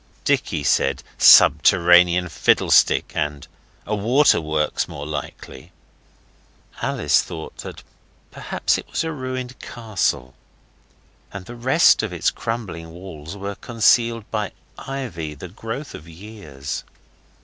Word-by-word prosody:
Dicky 75 Hz, -, 0 dB
said, 70 Hz, 0 st, +1 dB, 0.2 s
'Subterranean 90 Hz, 0 st, +6 dB
fiddlestick!' 80 Hz, -, +2 dB
and 75 Hz, -1 st, -3 dB, 0.4 s
'A 105 Hz, -, -2 dB
waterworks, 100 Hz, -, +1 dB
more 70 Hz, -, -8 dB
likely.' 75 Hz, 0 st, -8 dB, 1.1 s
Alice -, -, +2 dB
thought 80 Hz, -2 st, -9 dB, 0.5 s
perhaps -, -, -1 dB
it -, -, -11 dB
was -, -, -2 dB
a 160 Hz, -, -3 dB
ruined 130 Hz, -3 st, -6 dB
castle, 95 Hz, -, -3 dB, 1.0 s
and 100 Hz, -2 st, -8 dB
the 120 Hz, -, -10 dB
rest 130 Hz, +7 st, +4 dB
of 110 Hz, -3 st, -4 dB
its 90 Hz, -, 0 dB
crumbling 95 Hz, -8 st, -5 dB
walls 85 Hz, 0 st, -10 dB
were 100 Hz, +1 st, -5 dB
concealed 115 Hz, +1 st, +1 dB
by 105 Hz, -2 st, -3 dB, 0.2 s
ivy, 90 Hz, -, -6 dB
the 85 Hz, +6 st, -10 dB
growth 115 Hz, -, -7 dB
of 80 Hz, +3 st, -11 dB
years. 80 Hz, -7 st, -8 dB
95 Hz, 110 wpm, -21 LUFS, 80-115 Hz, 1.1 s, Subterranean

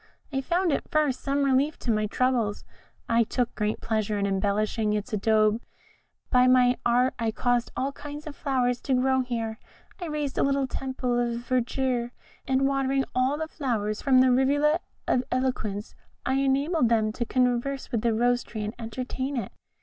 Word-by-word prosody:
I 270 Hz, -, 0 dB
found 345 Hz, +3 st, +1 dB
at -, -, -3 dB
first 300 Hz, -4 st, +1 dB
some 280 Hz, 0 st, 0 dB
relief 275 Hz, +3 st, +2 dB
to 240 Hz, -, -1 dB
my 215 Hz, -1 st, +1 dB
troubles; 235 Hz, -3 st, 0 dB, 0.4 s
I 230 Hz, 0 st, +4 dB
took 245 Hz, +2 st, -1 dB
great 210 Hz, 0 st, -2 dB
pleasure 215 Hz, -2 st, -1 dB
in 200 Hz, -, 0 dB
embellishing 210 Hz, +2 st, 0 dB
its 210 Hz, +3 st, -3 dB
abode; 215 Hz, +1 st, +2 dB, 0.7 s
by 250 Hz, -1 st, +5 dB
my 250 Hz, -1 st, +5 dB
art 245 Hz, +2 st, +3 dB
I 230 Hz, -1 st, 0 dB
caused 245 Hz, +2 st, 0 dB
all 270 Hz, +2 st, 0 dB
kinds 290 Hz, +1 st, -8 dB
of 305 Hz, -2 st, -7 dB
flowers 250 Hz, -3 st, 0 dB
to 265 Hz, -, 0 dB
grow 260 Hz, +1 st, +2 dB
here; 230 Hz, -3 st, -3 dB, 0.4 s
I 350 Hz, -, -3 dB
raised 300 Hz, -3 st, -2 dB
a -, -, +3 dB
little 275 Hz, 0 st, +2 dB
temple 260 Hz, -2 st, -2 dB
of 235 Hz, -1 st, -1 dB
verdure, 250 Hz, 0 st, -1 dB, 0.3 s
and 265 Hz, +1 st, +2 dB
watering 270 Hz, 0 st, +1 dB
all 260 Hz, +3 st, +1 dB
the 315 Hz, +1 st, -3 dB
flowers 225 Hz, -9 st, -2 dB
from 260 Hz, -2 st, +5 dB
the 260 Hz, 0 st, +5 dB
Rivulet 290 Hz, +5 st, +3 dB, 0.3 s
of 250 Hz, -, +2 dB
Eloquence, 250 Hz, -5 st, -2 dB, 0.3 s
I 260 Hz, -, +1 dB
enabled 275 Hz, +1 st, +2 dB
them 220 Hz, -2 st, +2 dB
to 240 Hz, -, -3 dB
converse 250 Hz, +2 st, 0 dB
with 230 Hz, -, 0 dB
the 235 Hz, -, +2 dB
Rose 245 Hz, +2 st, +2 dB
tree 215 Hz, -2 st, -6 dB
and 210 Hz, +1 st, -4 dB
entertain 255 Hz, +4 st, -4 dB
it. 215 Hz, -6 st, -3 dB
250 Hz, 175 wpm, -26 LUFS, 230-270 Hz, 0.7 s, by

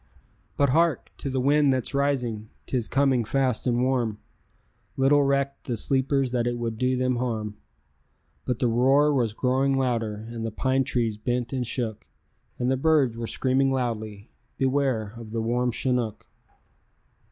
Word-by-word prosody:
But 140 Hz, -1 st, +3 dB
hark! 165 Hz, +1 st, +1 dB
to 140 Hz, -, -4 dB
the 130 Hz, 0 st, -1 dB
wind 145 Hz, +2 st, +3 dB
that's 130 Hz, 0 st, -1 dB
rising; 125 Hz, -6 st, -1 dB, 0.2 s
'tis 125 Hz, -4 st, -1 dB
coming 135 Hz, -2 st, +2 dB
fast 130 Hz, +1 st, 0 dB
and 120 Hz, 0 st, +2 dB
warm; 125 Hz, -5 st, 0 dB, 0.8 s
Little 140 Hz, +2 st, +4 dB
recked 140 Hz, 0 st, 0 dB
the 120 Hz, -3 st, -2 dB
sleepers 135 Hz, +1 st, +1 dB
that 120 Hz, -1 st, 0 dB
it 120 Hz, 0 st, -1 dB
would 115 Hz, -2 st, -4 dB
do 130 Hz, 0 st, +1 dB
them 125 Hz, -1 st, +1 dB
harm; 110 Hz, -4 st, -3 dB, 0.9 s
But 125 Hz, -, -1 dB
the 125 Hz, -, +1 dB
roar 135 Hz, +6 st, +4 dB
was 115 Hz, -6 st, 0 dB
growing 135 Hz, +2 st, +1 dB
louder, 115 Hz, -4 st, -1 dB
as 115 Hz, -1 st, -6 dB
the 115 Hz, -, -2 dB
pine 130 Hz, +4 st, 0 dB
trees 115 Hz, -4 st, 0 dB
bent 120 Hz, +3 st, -2 dB
and 125 Hz, -3 st, -2 dB
shook, 115 Hz, -4 st, -3 dB, 0.5 s
And 125 Hz, +1 st, 0 dB
the 130 Hz, -, +1 dB
birds 140 Hz, -5 st, +3 dB
were 115 Hz, 0 st, -4 dB
screaming 135 Hz, +2 st, +1 dB
loudly, 110 Hz, -5 st, -3 dB, 0.3 s
"Beware 130 Hz, -6 st, 0 dB
of 115 Hz, -2 st, -9 dB
the 115 Hz, +1 st, -3 dB
warm 125 Hz, +2 st, 0 dB
chinook." 125 Hz, -2 st, -1 dB
125 Hz, 160 wpm, -25 LUFS, 115-135 Hz, 0.9 s, Little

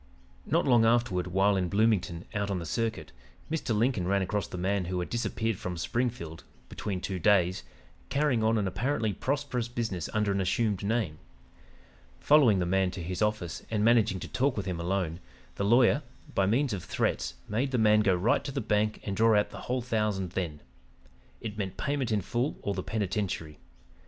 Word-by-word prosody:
"Not 165 Hz, +3 st, +2 dB
long 120 Hz, -4 st, +5 dB
afterward, 115 Hz, -6 st, +2 dB
while 95 Hz, +3 st, +3 dB
in 90 Hz, -2 st, 0 dB
Bloomington, 100 Hz, -5 st, +1 dB
out 100 Hz, -1 st, -1 dB
on 100 Hz, -, -1 dB
the 85 Hz, -, -5 dB
circuit, 110 Hz, -, -2 dB, 0.4 s
Mr. 135 Hz, -9 st, -1 dB
Lincoln 110 Hz, -5 st, +1 dB
ran 100 Hz, 0 st, +2 dB
across 105 Hz, +2 st, -2 dB
the -, -, -7 dB
man 95 Hz, +1 st, 0 dB
who 90 Hz, +1 st, -2 dB
had 90 Hz, -, -4 dB
disappeared 115 Hz, -3 st, -1 dB
from 90 Hz, -1 st, -4 dB
Springfield 85 Hz, -4 st, -2 dB, 0.3 s
'between 95 Hz, -3 st, -4 dB
two 95 Hz, -2 st, -3 dB
days,' 95 Hz, -2 st, +3 dB, 0.5 s
carrying 140 Hz, -3 st, +1 dB
on 110 Hz, +1 st, +3 dB
an 100 Hz, -2 st, 0 dB
apparently 115 Hz, +1 st, -1 dB
prosperous 130 Hz, 0 st, -2 dB
business 110 Hz, -8 st, -3 dB
under 105 Hz, -2 st, +1 dB
an 100 Hz, 0 st, 0 dB
assumed 100 Hz, +1 st, 0 dB
name. 100 Hz, -7 st, -1 dB, 1.0 s
Following 140 Hz, -9 st, +5 dB
the 90 Hz, -, 0 dB
man 95 Hz, +1 st, +2 dB
to 90 Hz, -1 st, -6 dB
his 90 Hz, +3 st, -4 dB
office 105 Hz, -6 st, -1 dB
and 105 Hz, -1 st, +1 dB
managing 110 Hz, -5 st, +4 dB
to -, -, -5 dB
talk 130 Hz, -1 st, 0 dB
with 100 Hz, -, -2 dB
him 90 Hz, -3 st, -3 dB
alone, 85 Hz, -1 st, -1 dB, 0.3 s
the -, -, -3 dB
lawyer, 120 Hz, +6 st, +4 dB, 0.3 s
by 95 Hz, -, +2 dB
means 125 Hz, +4 st, +2 dB
of 95 Hz, -, -4 dB
threats, 65 Hz, -, -1 dB
made 120 Hz, +6 st, 0 dB
the 130 Hz, -, 0 dB
man 105 Hz, -1 st, +5 dB
go 100 Hz, -3 st, +3 dB
right 90 Hz, +6 st, +2 dB
to -, -, -4 dB
the -, -, -2 dB
bank 105 Hz, 0 st, 0 dB
and 100 Hz, -, -3 dB
draw 110 Hz, +1 st, +4 dB
out 105 Hz, -, -1 dB
the -, -, -8 dB
whole 125 Hz, -1 st, 0 dB
thousand 105 Hz, -6 st, -1 dB
then. 85 Hz, -6 st, -3 dB, 0.8 s
It 110 Hz, -1 st, -6 dB
meant 95 Hz, -2 st, -3 dB
payment 140 Hz, -5 st, -1 dB
in 105 Hz, -2 st, +2 dB
full 120 Hz, +9 st, -2 dB
or 100 Hz, -, -1 dB
the 95 Hz, -, -3 dB
penitentiary. 95 Hz, -7 st, -3 dB
105 Hz, 190 wpm, -29 LUFS, 95-115 Hz, 1.0 s, long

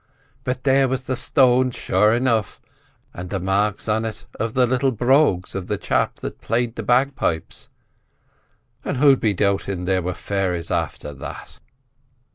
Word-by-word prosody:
But 125 Hz, 0 st, -3 dB
there 135 Hz, 0 st, +4 dB
was 130 Hz, 0 st, -2 dB
the 130 Hz, 0 st, -2 dB
stone, 130 Hz, 0 st, +3 dB
sure 105 Hz, -3 st, +2 dB
enough, 115 Hz, -3 st, 0 dB, 0.5 s
and 90 Hz, +1 st, -7 dB
the 95 Hz, -, -2 dB
marks 100 Hz, +4 st, 0 dB
on 110 Hz, +1 st, +1 dB
it 110 Hz, -1 st, -6 dB
of 110 Hz, 0 st, -2 dB
the 125 Hz, -1 st, +4 dB
little 130 Hz, +2 st, +1 dB
brogues 120 Hz, -, +2 dB
of 95 Hz, -2 st, -5 dB
the -, -, -1 dB
chap -, -, 0 dB
that'd -, -, -8 dB
played 115 Hz, +1 st, -1 dB
the -, -, -4 dB
bagpipes—and 125 Hz, -4 st, -4 dB
who'd 140 Hz, -1 st, +5 dB
be 105 Hz, -3 st, +1 dB
doubtin' 100 Hz, -2 st, -1 dB
there 95 Hz, 0 st, +1 dB
were 90 Hz, +1 st, -3 dB
fairies 95 Hz, -4 st, -2 dB
after 75 Hz, -, -3 dB
that?" 70 Hz, -, -9 dB
110 Hz, 150 wpm, -22 LUFS, 95-130 Hz, 0.5 s, who'd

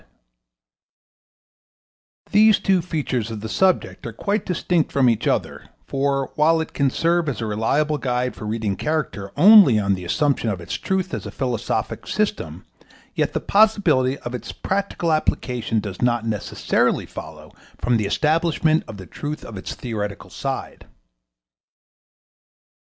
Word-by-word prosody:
] -, -, -71 dB, 1.5 s
These 215 Hz, 0 st, +6 dB
two 190 Hz, -2 st, +2 dB
features 140 Hz, -9 st, -2 dB
of 110 Hz, -2 st, -6 dB
the 110 Hz, -, -5 dB
subject 185 Hz, +9 st, +1 dB
are -, -, -5 dB
quite 200 Hz, -, -2 dB
distinct 175 Hz, -2 st, 0 dB
from 135 Hz, -2 st, +3 dB
each 115 Hz, -3 st, +1 dB
other, -, -, -2 dB, 0.2 s
for, 135 Hz, 0 st, -1 dB
while 160 Hz, +2 st, +3 dB
it 160 Hz, -, -4 dB
can 140 Hz, -1 st, +2 dB
serve 170 Hz, +3 st, +1 dB
as 125 Hz, -, -4 dB
a 115 Hz, -, -2 dB
reliable 140 Hz, +8 st, 0 dB
guide 125 Hz, -1 st, -1 dB
for 110 Hz, -, -8 dB
reading 105 Hz, -2 st, -2 dB
character 120 Hz, -7 st, -3 dB
only 190 Hz, -, +8 dB
on 100 Hz, -1 st, +1 dB
the 90 Hz, -1 st, -4 dB
assumption 140 Hz, -, 0 dB
of 100 Hz, -4 st, -2 dB
its 85 Hz, -, -7 dB
truth 190 Hz, -1 st, -2 dB
as -, -, -4 dB
a -, -, -5 dB
philosophic 120 Hz, -4 st, -3 dB
system, -, -, -2 dB, 0.5 s
yet -, -, 0 dB
the -, -, 0 dB
possibility 185 Hz, -12 st, +3 dB
of 120 Hz, -, -6 dB
its 120 Hz, -2 st, -5 dB
practical 195 Hz, -3 st, -2 dB
application 125 Hz, -7 st, 0 dB
does 100 Hz, -3 st, -6 dB
not 120 Hz, -2 st, +1 dB
necessarily 110 Hz, -3 st, 0 dB
follow -, -, -10 dB, 0.3 s
from 120 Hz, -1 st, +2 dB
the 105 Hz, -2 st, -1 dB
establishment 160 Hz, +5 st, +2 dB
of 105 Hz, -, -8 dB
the 95 Hz, -, -9 dB
truth 150 Hz, -, -6 dB
of 115 Hz, -, -9 dB
its 95 Hz, -, -6 dB
theoretical 105 Hz, -4 st, -5 dB
side. -, -, -5 dB
130 Hz, 150 wpm, -22 LUFS, 110-165 Hz, 1.5 s, only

